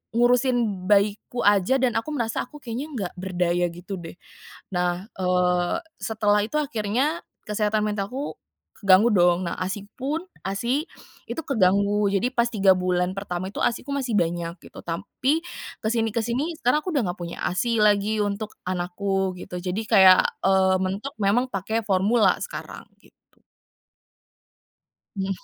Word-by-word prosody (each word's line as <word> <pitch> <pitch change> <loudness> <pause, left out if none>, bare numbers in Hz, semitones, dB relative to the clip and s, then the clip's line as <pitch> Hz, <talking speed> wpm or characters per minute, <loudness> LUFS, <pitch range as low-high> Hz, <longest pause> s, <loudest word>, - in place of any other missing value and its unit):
ngurusin 240 -5 +2
bayiku 210 +4 +2
aja, 205 +4 +4
dan 245 -3 +1
aku 230 - -2
merasa, 225 -4 -1
"Aku, 300 - -12
kayaknya 245 +5 -5
nggak 195 -7 -3
berdaya," 180 -1 0
gitu 175 +3 -7
deh. 165 0 -9 0.6
Nah, 180 +2 -1
eee, 180 -1 +1 0.3
setelah 210 -2 +2
itu 300 - -4
akhirnya 270 +4 -1 0.3
kesehatan 210 0 +1
mentalku, 210 +7 -3 0.4
keganggu 200 +3 +6
dong. 175 -1 +4
Nah, - - -4
ASI-pun 220 - -4 0.2
ASI 240 +10 -1 0.4
itu 325 - -3
keganggu. 200 -3 +2
Jadi, 220 +6 +1
pas 235 -1 +2
3 195 -4 +4
bulan 180 0 0
pertama 185 -1 -4
itu, - - -5
ASI-ku 250 +4 -1
masih 260 -5 -2
banyak, 170 0 -1
gitu. - - -11
Tampi, 265 - -1 0.4
kesini-kesini, 235 +7 -1
sekarang 250 +5 +3
aku 370 - -2
udah 275 - +2
nggak 175 - -7
punya 170 0 -6
ASI 225 +6 0
lagi, 210 +1 +3
untuk 205 +1 -3
anakku, 185 +1 -1
gitu. 180 0 -7
Jadi, 190 +4 -2
kayak, 185 -1 +8 0.2
eee, 190 -1 +4
mentok 200 +9 -3
memang, 210 +6 +2
pakai 220 +4 -1
formula 195 +1 +3
sekarang, - - -7 0.2
gitu. - - -23 2.0
Hmm. 190 0 -2
205 Hz, 135 wpm, -24 LUFS, 185-235 Hz, 2.0 s, kayak